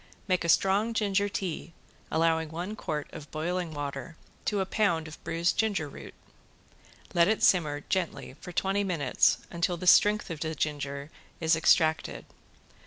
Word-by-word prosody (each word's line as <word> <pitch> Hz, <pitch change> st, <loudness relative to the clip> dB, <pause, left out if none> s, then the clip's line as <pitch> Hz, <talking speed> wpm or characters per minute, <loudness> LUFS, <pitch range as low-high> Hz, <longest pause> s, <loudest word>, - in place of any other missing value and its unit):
Make 185 Hz, -2 st, +1 dB
a 170 Hz, -, -2 dB
strong 200 Hz, +7 st, +3 dB
ginger 205 Hz, -2 st, +1 dB
tea, 175 Hz, -4 st, -4 dB, 0.4 s
allowing 160 Hz, 0 st, +1 dB
one 175 Hz, +6 st, -5 dB
quart 150 Hz, -7 st, -4 dB
of 150 Hz, -2 st, -9 dB
boiling 170 Hz, +2 st, -2 dB
water 145 Hz, +3 st, -5 dB, 0.3 s
to 205 Hz, -, 0 dB
a 190 Hz, -, +1 dB
pound 175 Hz, -6 st, +1 dB
of 155 Hz, -, -12 dB
bruised 170 Hz, +1 st, 0 dB
ginger 205 Hz, -9 st, +1 dB
root. 140 Hz, -, -11 dB, 1.0 s
Let 170 Hz, 0 st, +5 dB
it 220 Hz, +1 st, +1 dB
simmer 150 Hz, -5 st, +3 dB
gently 175 Hz, -6 st, -3 dB
for 180 Hz, -, -8 dB
twenty 195 Hz, +3 st, 0 dB
minutes 165 Hz, -9 st, +2 dB
until 170 Hz, +1 st, 0 dB
the 180 Hz, -, -6 dB
strength 210 Hz, +1 st, +5 dB
of 160 Hz, -, -5 dB
the 160 Hz, 0 st, -3 dB
ginger 145 Hz, 0 st, -3 dB, 0.3 s
is 160 Hz, 0 st, +3 dB
extracted. 160 Hz, -1 st, +2 dB
170 Hz, 155 wpm, -28 LUFS, 155-190 Hz, 1.0 s, Let